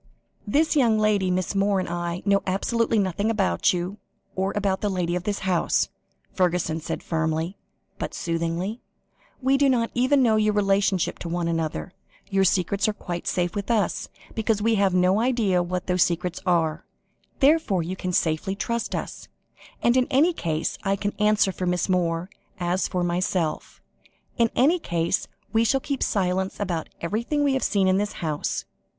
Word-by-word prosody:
"This 310 +9 +2
young 235 -6 +4
lady, 210 -3 +2
Miss 180 +1 0
Moore, 200 0 +2
and 185 - -2
I, 175 +1 -3
know 200 -1 +3
absolutely 225 +4 +1
nothing 200 +1 0
about 210 -4 +2
you, 180 +3 -3 0.4
or 190 +1 0
about 200 -2 0
the 210 - 0
lady 180 -2 -1
of 180 0 -3
this 205 -1 -2
house," 180 -3 +1 0.4
Fergusson 175 -3 0
said 160 - -4
firmly, 160 +2 -1 0.4
but - - -4
soothingly. 170 +6 -2 0.6
"We 270 +1 +4
do 280 -1 +4
not 235 -3 +1
even 260 +2 +3
know 220 -3 +4
your 215 -1 +2
relationship 195 -2 +1
to 170 - -5
one 170 0 -1
another. 160 - -2 0.4
Your 195 0 +3
secrets 195 +3 +1
are 215 - +1
quite 175 -4 -6
safe 175 -1 0
with 205 +1 -4
us, 215 -5 0 0.2
because 220 -1 0
we 225 +2 +2
have 195 -3 +2
no 185 +3 +3
idea 225 -7 +2
what 180 +1 -3
those 180 -1 +1
secrets 180 +1 0
are. 165 -3 +1 0.6
Therefore, 275 - +3
you 180 +3 -4
can 185 -1 -3
safely 165 +3 0
trust 235 +2 -2
us. - - -6 0.6
And, 240 - +4
in 255 -1 +3
any 295 +6 +4
case, 160 - -2
I 195 -1 +1
can 205 +1 -2
answer 210 -2 +3
for 185 0 -4
Miss 180 0 0
Moore, 175 -2 0 0.3
as 180 +1 0
for 180 -2 -1
myself 175 -2 -2 0.6
in 230 -1 +4
any 315 +8 +4
case, 170 - -1 0.3
we 225 +1 +4
shall 270 +4 +2
keep 275 0 -4
silence 190 -1 0
about 175 -6 -2
everything 235 - -1
we 280 -1 +2
have 265 - 0
seen 195 -2 +2
in 185 0 +3
this 205 +1 -1
house." 155 -4 -3
190 Hz, 175 wpm, -25 LUFS, 175-215 Hz, 0.6 s, young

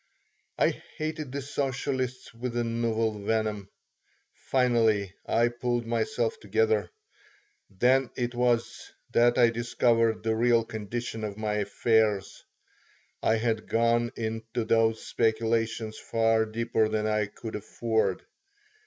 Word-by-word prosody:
I - - +4 0.3
hated 155 -3 -4
the 140 0 -4
socialists 130 -2 -3
with 120 +1 -4
a 120 - +1
novel 115 -2 -1
venom. 105 -2 -1 0.6
Finally 115 -7 +1
I 120 +1 +3
pulled 120 0 -2
myself 120 - -1
together. 450 +1 +1 0.8
Then 125 +6 +2
it 120 -1 -2
was 120 -1 0 0.2
that 120 0 +4
I 120 -2 +5
discovered 115 -1 +1
the 110 0 +1
real 115 0 +3
condition 110 +1 -5
of 105 -1 -4
my 110 -1 -1
affairs. 105 0 +1 0.8
I 110 - +3
had 115 0 -1
gone 115 +1 +2
into 115 +1 -3
those 115 0 +2
speculations 115 0 0
far 115 -1 +1
deeper 110 0 0
than 110 0 -1
I 105 -1 +1
could 110 +2 -8
afford. 110 -2 -1
115 Hz, 120 wpm, -28 LUFS, 110-120 Hz, 0.8 s, I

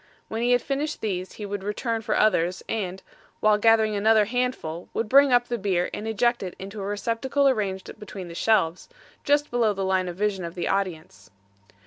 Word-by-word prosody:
When 225 +1 -3
he 245 +1 +3
had 245 - +2
finished 290 +2 -2
these 185 -3 -3
he 210 - -7
would 200 -1 -5
return 225 +3 -2
for - - -1
others 185 -4 +2
and, 190 -4 -3 0.4
while 215 -1 +3
gathering 220 -1 +4
another 215 +1 +4
handful, 230 -8 -3
would 225 - -1
bring 275 +3 +6
up 245 0 +4
the 240 -1 -2
beer 185 -3 0
and 215 - -5
eject 240 +2 +1
it 185 -2 -5
into 200 +2 -7
a - - -4
receptacle 230 +7 0
arranged 200 -7 -1
between 200 -3 -8
the 170 - -9
shelves, 185 - +1 0.3
just 290 0 +2
below 235 -3 +2
the 195 -1 -3
line 190 -1 +1
of 175 - -5
vision 200 -1 -1
of 170 0 -6
the 175 - -2
audience. 165 - -3
210 Hz, 195 wpm, -25 LUFS, 190-230 Hz, 0.4 s, bring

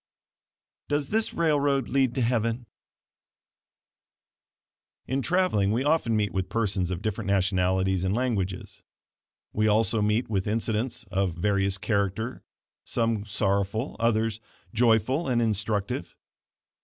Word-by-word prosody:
"DOES 145 -1 -1
THIS 220 +1 0
RAILROAD 145 -5 +2
LEAD 130 -2 +1
TO 130 - 0
HEAVEN?" 115 0 0 2.4
In 135 +2 -1
traveling 170 - +2
we 120 +4 +1
often 145 -6 +2
meet 105 -1 0
with 95 -1 -2
persons 100 -5 0
of 90 0 -4
different 110 -1 -2
nationalities 95 -1 +1
and 95 +2 0
languages; 100 -7 -2 0.7
we 110 +1 +2
also 110 0 +2
meet 105 +4 +1
with 100 -3 -1
incidents 115 +2 -1
of 95 -3 0
various 100 +1 +1
character, 105 +3 -1 0.4
some 115 -3 -1
sorrowful, 100 +3 -1
others, 115 -2 +1 0.3
joyful 120 +6 +2
and 125 -2 +2
instructive. 105 -2 -1
110 Hz, 115 wpm, -27 LUFS, 100-120 Hz, 2.4 s, RAILROAD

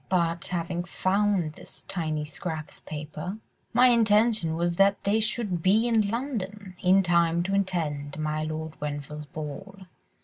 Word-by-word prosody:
But 170 -2 +1
having 175 0 -2
found 185 -2 +1
this - - -6
tiny 155 -4 -2
scrap 155 0 -5
of - - -21
paper, 155 +5 -5 0.3
my 250 +2 +6
intention 215 -6 +3
was 170 +1 0
that 200 0 +4
they 205 +2 +2
should 215 -5 -1
be 210 +7 +4
in 225 -2 +4
London, 210 -6 -4
in 190 +2 +5
time 170 -1 +3
to 195 +2 -2
attend 160 -8 -1
my 155 0 -1
Lord 155 0 -5
Grenville's 150 0 -5
ball. 155 +7 -7
175 Hz, 145 wpm, -27 LUFS, 155-200 Hz, 0.3 s, my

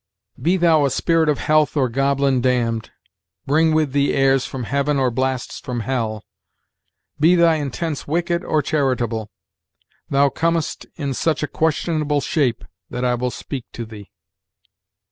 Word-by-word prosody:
"'Be 180 +4 +2
thou 165 -4 +4
a - - +2
spirit 165 +2 +2
of 145 - +2
health 155 0 +2
or 130 -3 +3
goblin 135 +1 +1
damn'd, 120 -3 0 0.6
Bring 160 +3 +3
with 155 -3 +1
thee 140 +1 +1
airs 135 -1 +3
from 130 -2 -5
heaven 140 +4 0
or 130 -2 +2
blasts 130 +1 -2
from 125 -2 -4
hell, 110 -4 -2 1.0
Be 165 +4 +5
thy 170 -2 +4
intents 150 +1 -4
wicked 170 +3 0
or 155 -2 0
charitable, 120 -7 -1 0.8
Thou 140 0 +3
com'st 165 +1 -1
in 140 -4 -3
such 155 +4 0
a - - 0
questionable 155 -2 0
shape 135 -4 0 0.2
That 125 +1 -3
I 125 - +2
will 125 +1 -1
speak 130 0 -6
to 120 - -5
thee.' 105 -2 -11
140 Hz, 150 wpm, -21 LUFS, 125-155 Hz, 1.0 s, Be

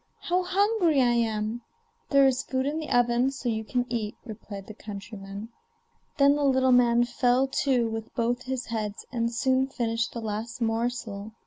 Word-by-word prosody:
how 360 +1 +1
hungry 370 -4 +2
I 245 -2 +4
am!' 225 0 -1 0.5
'There 275 -1 +6
is 260 -2 +3
food 260 0 -2
in 300 +3 -1
the 310 - -6
oven, 245 +1 +3
so 270 -2 -4
you 220 -1 -1
can 245 +3 -1
eat,' 225 -3 -3
replied 210 -3 -8
the 215 - -9
countryman. 200 0 -8 0.7
Then 280 0 +5
the 295 - -1
little 260 -1 +3
man 240 -1 +5
fell 245 +1 +2
to 265 -3 +1
with 225 0 -5
both 240 +1 0
his 260 -1 -4
heads, 215 -3 -4
and 235 -2 -1
soon 260 +2 +1
finished 230 -3 -1
the 235 - -4
last 220 +2 -4
morsel. 225 -2 -2
240 Hz, 175 wpm, -27 LUFS, 225-265 Hz, 0.7 s, There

